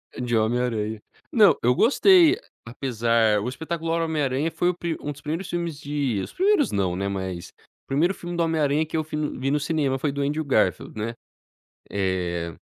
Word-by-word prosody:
De 120 -1 -1
Homem 110 +3 +1
Aranha. 110 -3 -2 0.3
Não, 215 -4 +6
eu 125 +1 +3
gostei, 345 - +5 0.3
apesar 115 -3 +1
O 115 - -2
Espetacular 165 +3 -2
Homem 160 -2 -1
Aranha 140 +4 0
foi 175 - +1
o 180 - -2
pri 170 -2 -3
um 145 - -3
dos 145 0 -11
primeiros 160 +5 -4
filmes 170 -4 -3
de 140 -8 -1
os - - -8
primeiros 385 -6 +2
não, 95 -3 0
né. 100 +2 -2
Mas, 95 -3 -4 0.4
primeiro 160 +7 +2
filme 175 -2 -7
do 170 - +2
Homem 165 -1 0
Aranha 145 +2 +2
que 155 - -7
eu 160 - +1
fui 150 0 -5
no 150 -3 -3
vi 135 +1 0
no 150 - +2
cinema, 145 -3 0
foi 145 +1 0
do 140 +1 -3
Andrew 150 +3 -1
Garfield, 120 -4 0
né, 110 +2 -3 0.8
eh 90 -4 -2
140 Hz, 200 wpm, -24 LUFS, 115-165 Hz, 0.8 s, Não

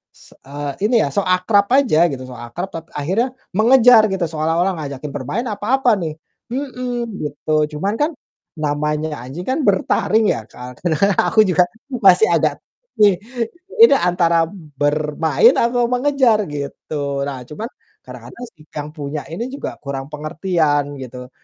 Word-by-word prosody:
se - - -19
eee, 145 0 -4 0.2
ini 240 - +1
ya, - - 0
sok 200 -2 0
akrab 200 +3 +3
aja 175 - +4
gitu, 130 -1 -6
sok 125 -2 -10
akrab, 120 +11 -5
tap 165 0 -7
akhirnya 190 - 0 0.3
mengejar 230 0 +6
gitu, 190 -2 -2
seolah-olah 165 +4 0
ngajakin 140 -1 -6
bermain 145 - -3
apa-apa 220 +1 +1
nih, 155 -2 -4 0.4
mhm, 250 -2 -3 0.3
gitu. 150 +1 -1
Cuman, 195 +6 -1
kan 300 +3 +1 0.5
namanya 150 +1 -1
anjing 140 +8 -7
kan 265 +4 0
bertaring 210 +2 +2
ya, 110 - -6
Kak, 125 0 -11
kadang-kadang 175 +4 +2
aku 220 - +1
juga 180 -1 +4 0.4
masih 185 +3 +6
agak - - +1 0.4
ini 205 -3 +6 0.7
ini 465 - +8
antara 170 -4 +2 0.4
bermain 150 0 +3
atau 240 0 +2
mengejar, 250 -3 +2
gitu. 140 -1 -4
Nah, 135 -2 -5
cuman 155 +8 -7 0.4
kadang-kadang 245 - -10
si 155 - -20
yang 150 0 -4
punya 150 -1 -5
ini 230 +9 -4
juga 280 - -6
kurang 135 -1 -5
pengertian 150 -2 -1
gitu, 125 -1 -9
165 Hz, 145 wpm, -19 LUFS, 145-215 Hz, 0.7 s, ini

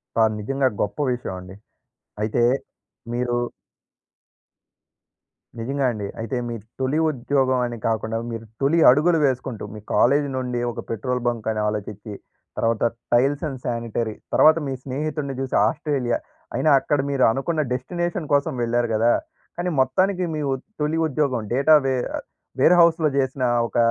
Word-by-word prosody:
కాద్ 110 -1 +3
నిజంగా 135 +6 0
గొప్ప 100 - -2 0.2
విషయమండి. 95 -6 -6 0.7
అయితే, 110 +2 +1 0.7
మీరు 120 0 0 2.2
నిజంగా 135 +4 -1
అండి. 105 -3 -4
అయితే 115 +3 -3
మీ 120 - -4 0.2
తొలి 135 +4 +1
ఉద్యోగం 130 -1 +1
అని 120 0 -6
కాకుండా, 110 0 -1
మీరు 115 0 -6 0.2
తొలి 145 +5 +3
అడుగులు 160 +6 +4
వేసుకుంటూ, 130 -3 -2
మీ - - -7
కాలేజీ 140 +3 +3
నుండి 125 -1 -2
ఒక - - -8
పెట్రోల్ 125 +3 -2
బంక్ 115 -3 -2
అని 110 -1 -2
ఆలోచిచ్చి, 105 0 -5 0.4
తర్వాత 115 -1 +1 0.3
టైల్స్ 135 +5 +3
అండ్ 135 -3 -6
శానిటరీ 115 -2 -2 0.2
తర్వాత 155 +1 +6
మీ 135 - -2
స్నేహితుడిని 140 +1 -3
చూసి 135 -1 -2
ఆస్ట్రేలియా. 135 -6 -1 0.4
అయినా 155 - +2
అక్కడ 145 +2 0
మీరు 140 -2 +1
అనుకున్న 155 +6 -1
డెస్టినేషన్ 175 +5 -3
కోసం 140 0 +2
వెళ్లారు 120 +1 +1
కదా! 115 +2 +3 0.5
కానీ 175 +1 -1
మొత్తానికి 185 +9 +2
మీ 155 - -2
ఉ - - +2 0.3
తొలి 150 +2 0
ఉద్యోగం 140 -4 0
డేటా 140 +5 +5
వే 135 - +2 0.2
ఆహ్, - - -5 0.4
వేర్‌హౌస్‌లో 170 +1 +5
చేసినా 130 -1 0 0.2
ఒక - - -5
130 Hz, 140 wpm, -23 LUFS, 115-145 Hz, 2.2 s, తర్వాత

